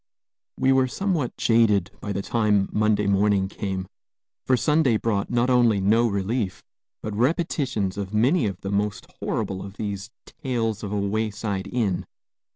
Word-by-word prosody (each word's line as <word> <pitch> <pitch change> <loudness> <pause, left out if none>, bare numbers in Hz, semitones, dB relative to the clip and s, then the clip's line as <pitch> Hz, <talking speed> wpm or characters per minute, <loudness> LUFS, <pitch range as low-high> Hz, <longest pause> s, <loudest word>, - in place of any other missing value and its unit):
We 130 - +3
were 130 -1 +4
somewhat 165 -2 -2
jaded 105 -5 +3
by 105 - -4
the 100 0 -2
time 105 -4 +1
Monday 105 -1 +2
morning 100 0 +2
came, 95 -1 -4 0.6
for 130 - +4
Sunday 150 -4 +3
brought 105 -3 -1
not 120 +1 +2
only 120 -5 +4
no 110 +5 +3
relief, 100 0 -2 0.4
but 110 - -4
repetitions 125 - 0
of 100 -1 -4
many 120 +5 +3
of 95 -1 -5
the 100 - -4
most 100 0 -1
horrible 95 -1 -2
of 100 +1 -10
these 100 0 -4 0.2
"tales 115 -5 -3
of 100 - -5
a 105 - -1
wayside 105 -1 -2
inn." 100 -7 -1
105 Hz, 155 wpm, -24 LUFS, 100-120 Hz, 0.6 s, were